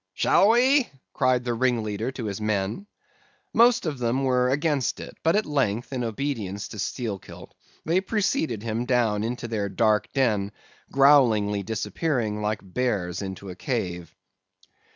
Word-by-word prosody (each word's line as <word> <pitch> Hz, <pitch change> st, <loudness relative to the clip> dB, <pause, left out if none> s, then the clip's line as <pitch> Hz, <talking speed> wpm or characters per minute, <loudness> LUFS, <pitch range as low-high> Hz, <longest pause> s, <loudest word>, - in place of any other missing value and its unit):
"'Shall 200 Hz, -, +4 dB
we?' 255 Hz, +3 st, +4 dB, 0.2 s
cried 130 Hz, -1 st, +2 dB
the 120 Hz, -, 0 dB
ringleader 115 Hz, -2 st, -1 dB
to 130 Hz, -3 st, -6 dB
his 100 Hz, 0 st, -4 dB
men. 105 Hz, -, -2 dB, 0.7 s
Most 235 Hz, -2 st, +4 dB
of 150 Hz, -5 st, -3 dB
them 125 Hz, +3 st, 0 dB
were 125 Hz, -1 st, +2 dB
against 145 Hz, -2 st, 0 dB
it; -, -, -9 dB
but 165 Hz, +3 st, +2 dB
at 210 Hz, -, +2 dB
length, 130 Hz, -5 st, -1 dB
in 125 Hz, -2 st, -2 dB
obedience 110 Hz, -4 st, -3 dB
to 110 Hz, -, -8 dB
Steelkilt, 110 Hz, -3 st, -5 dB, 0.3 s
they 170 Hz, +4 st, +2 dB
preceded 175 Hz, -, -1 dB
him 115 Hz, +1 st, -2 dB
down 115 Hz, -5 st, +1 dB
into 120 Hz, +1 st, -3 dB
their 105 Hz, -3 st, -2 dB
dark 105 Hz, -1 st, +1 dB
den, 105 Hz, -7 st, +1 dB, 0.4 s
growlingly 120 Hz, -8 st, +4 dB
disappearing, 110 Hz, -, -2 dB
like 105 Hz, 0 st, -1 dB
bears 95 Hz, -3 st, -2 dB
into 95 Hz, 0 st, -6 dB
a -, -, -9 dB
cave. 90 Hz, -, -4 dB
115 Hz, 145 wpm, -25 LUFS, 105-135 Hz, 0.7 s, Shall